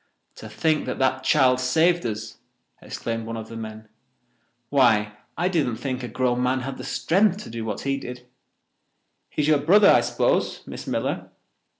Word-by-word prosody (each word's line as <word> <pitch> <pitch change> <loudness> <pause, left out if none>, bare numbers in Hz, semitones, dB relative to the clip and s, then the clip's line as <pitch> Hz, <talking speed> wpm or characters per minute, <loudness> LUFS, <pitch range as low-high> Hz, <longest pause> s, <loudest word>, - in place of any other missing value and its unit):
"To 110 - -9
think 150 +8 0
that - - -3
that 130 0 +1
child 130 -1 +4
saved 160 +6 +2
us!" 110 0 -6 0.4
exclaimed 115 -1 -5
one 115 0 -4
of 110 0 -8
the 115 - -8
men. 110 -1 -8 0.8
"Why, 110 -7 +3 0.2
I 175 - +1
didn't 155 -10 0
think 130 +2 -4
a 125 - -5
grown 125 +1 0
man 125 +1 +1
had 135 +1 -6
the - - -6
strength 190 +2 +1
to - - -10
do 115 -1 -5
what 105 -2 -4
he 135 0 -1
did. 125 -2 -8 1.0
He 150 - -2
is - - 0
your 155 -2 +4
brother, 195 +8 +6
I - - +5
suppose, - - 0
Miss - - -8
Miller. - - -2
130 Hz, 180 wpm, -24 LUFS, 115-150 Hz, 1.0 s, brother